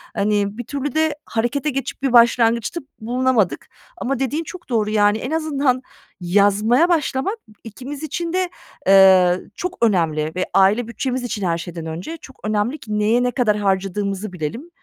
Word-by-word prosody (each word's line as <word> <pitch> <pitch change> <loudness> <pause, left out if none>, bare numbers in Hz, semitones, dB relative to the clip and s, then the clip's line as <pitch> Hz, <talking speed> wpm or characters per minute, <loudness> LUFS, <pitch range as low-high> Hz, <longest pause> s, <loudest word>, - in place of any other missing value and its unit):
hani, 205 +1 0
bir 245 - -4
türlü 285 -1 -4
de 315 -1 +2
harekete 240 +6 -1
geçip 275 -1 -4
bir 260 -3 +1
başlangıçta 235 +5 +4 0.2
bulunamadık 245 -3 0 0.3
ama 270 0 -2
dediğin 290 +5 -1
çok 345 -2 -11
doğru, 215 -3 +1
yani, 205 0 +3
en 255 +6 -5
azından 285 -5 0 0.4
yazmaya 205 - +3
başlamak, 320 - 0 0.3
ikimiz 265 +7 -8
için 335 +3 -3
de, 370 -1 0 0.4
eee, 190 -2 +6 0.2
çok 365 0 -4
önemli 160 -8 +1
ve 185 - -1
aile 205 +5 +4
bütçemiz 250 +2 -3
için 210 -5 -3
her 170 -1 0
şeyden 165 -1 -7
önce 175 - -6
çok 265 -3 -15
önemli 215 +6 -1
ki 210 -5 -4
neye 230 +4 +2
ne 250 - +1
kadar 215 -5 +1
harcadığımızı 195 0 -1
bilelim. 180 - -5
230 Hz, 160 wpm, -20 LUFS, 200-275 Hz, 0.4 s, eee